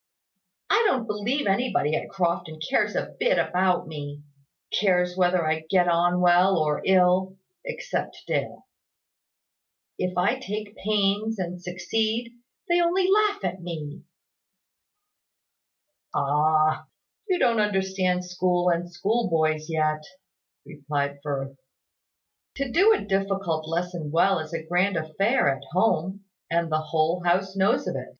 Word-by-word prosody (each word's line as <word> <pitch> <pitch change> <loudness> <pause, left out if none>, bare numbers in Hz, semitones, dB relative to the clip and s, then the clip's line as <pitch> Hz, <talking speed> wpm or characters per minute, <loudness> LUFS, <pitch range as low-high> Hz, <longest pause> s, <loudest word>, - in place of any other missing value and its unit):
"I 420 +3 +4
don't 255 - 0
believe 225 +6 -1
anybody 195 - +1
at - - -4
Crofton 170 -3 -2
cares 155 - 0
a - - -3
bit - - +2
about 180 -1 +1
me 145 -2 -7 0.6
cares 180 -2 +2
whether 180 -2 +2
I 155 0 +1
get 180 -2 +3
on 175 +1 +2
well 180 +1 +5
or 150 -2 0
ill 185 0 +3 0.3
except - - -4
Dale. - - -3 1.3
If 180 0 -2
I 195 +9 +2
take 210 -3 -6
pains 210 +1 0
and 180 -1 -4
succeed, 220 +7 -2 0.3
they 345 0 +3
only 360 +2 +2
laugh 420 - +2
at 180 0 -3
me." 160 -4 -6 2.1
"Ah! 155 +2 +2 0.4
You 370 - +2
don't 230 -9 +2
understand 190 -3 0
school 180 0 +1
and 175 0 -1
schoolboys 170 -6 0
yet," 155 -1 0 0.6
replied 140 -1 -3
Firth. 135 -2 -4 1.0
"To 275 -2 -3
do 390 - +5
a 430 - +1
difficult 195 -5 -1
lesson 170 -1 -3
well 170 +4 +3
is 155 0 -7
a 165 -1 -5
grand 180 +3 +1
affair 195 - +1
at 135 - -12
home, 190 0 0 0.2
and 170 -1 0
the 155 0 +1
whole 160 +3 0
house 190 +2 +1
knows 195 +1 +2
of - - -2
it. - - -5
180 Hz, 130 wpm, -25 LUFS, 160-200 Hz, 2.1 s, well